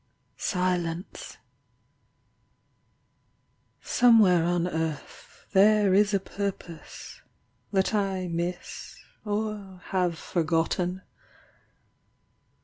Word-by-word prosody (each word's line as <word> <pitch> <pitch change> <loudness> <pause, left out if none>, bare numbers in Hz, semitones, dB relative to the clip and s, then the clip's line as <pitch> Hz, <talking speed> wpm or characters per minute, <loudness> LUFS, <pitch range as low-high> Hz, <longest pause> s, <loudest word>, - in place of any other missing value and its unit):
SILENCE— 180 -2 -2 2.5
Somewhere 210 -9 +5
on 175 0 +1
earth 160 -3 -5
There 205 0 +5
is 205 +1 +4
a 200 - +2
purpose 195 -4 -7 0.5
that 190 +1 +1
I 195 -3 0
miss 170 +1 -5 0.3
or 205 -3 -4
have 180 -3 +1
forgotten. 175 +3 -1
185 Hz, 65 wpm, -27 LUFS, 175-200 Hz, 2.5 s, Somewhere